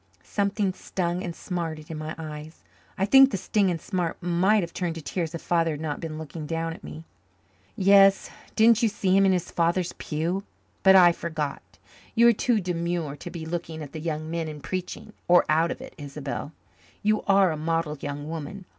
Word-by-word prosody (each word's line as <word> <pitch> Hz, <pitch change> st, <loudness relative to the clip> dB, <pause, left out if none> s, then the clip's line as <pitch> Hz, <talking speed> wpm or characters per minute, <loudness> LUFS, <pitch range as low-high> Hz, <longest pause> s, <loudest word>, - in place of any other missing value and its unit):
Something 200 Hz, -1 st, -1 dB
stung 180 Hz, -1 st, -3 dB
and 170 Hz, -2 st, -5 dB
smarted 165 Hz, -4 st, -5 dB
in 160 Hz, -, -5 dB
my 155 Hz, +1 st, -5 dB
eyes. 155 Hz, 0 st, -8 dB, 0.3 s
I 195 Hz, -, +1 dB
think 270 Hz, +5 st, +7 dB
the 195 Hz, -, -2 dB
sting 195 Hz, +1 st, +1 dB
and 170 Hz, -2 st, -2 dB
smart 175 Hz, -3 st, -2 dB
might 185 Hz, +4 st, +2 dB
have 170 Hz, -, -6 dB
turned 175 Hz, -3 st, -2 dB
to 165 Hz, -, -6 dB
tears 165 Hz, 0 st, -3 dB
if 165 Hz, -, -7 dB
Father 165 Hz, -1 st, +2 dB
had 145 Hz, -, -6 dB
not 155 Hz, -2 st, -3 dB
been 160 Hz, -2 st, -5 dB
looking 155 Hz, 0 st, -7 dB
down 165 Hz, +1 st, -2 dB
at -, -, -13 dB
me. 160 Hz, +1 st, -9 dB, 0.7 s
"Yes. 195 Hz, -1 st, +5 dB, 0.2 s
Didn't 230 Hz, +1 st, +5 dB
you 230 Hz, -, +3 dB
see 190 Hz, -2 st, +1 dB
him 195 Hz, 0 st, +5 dB
in -, -, +4 dB
his 180 Hz, -2 st, -1 dB
father's 170 Hz, +1 st, 0 dB
pew? 170 Hz, +5 st, -2 dB, 0.4 s
But 190 Hz, 0 st, +7 dB
I 175 Hz, -2 st, +8 dB
forgot. 160 Hz, -4 st, -4 dB, 0.5 s
You 235 Hz, 0 st, +6 dB
are -, -, +5 dB
too 235 Hz, 0 st, +1 dB
demure 170 Hz, -4 st, -2 dB
to 175 Hz, -, -8 dB
be 170 Hz, -2 st, -7 dB
looking 160 Hz, -1 st, -5 dB
at 145 Hz, -, -9 dB
the 160 Hz, -, -6 dB
young 155 Hz, -1 st, -3 dB
men 165 Hz, -1 st, -2 dB
in 150 Hz, -1 st, -7 dB
preaching 185 Hz, +5 st, -5 dB
or 175 Hz, 0 st, +6 dB
out 160 Hz, +2 st, +3 dB
of -, -, -5 dB
it, -, -, -10 dB
Isobel. 145 Hz, +1 st, -5 dB, 0.5 s
You 215 Hz, +1 st, +2 dB
are 195 Hz, -2 st, +5 dB
a -, -, -2 dB
model 160 Hz, 0 st, -1 dB
young 145 Hz, +1 st, -5 dB
woman. 165 Hz, +4 st, -6 dB
170 Hz, 200 wpm, -26 LUFS, 160-190 Hz, 0.7 s, I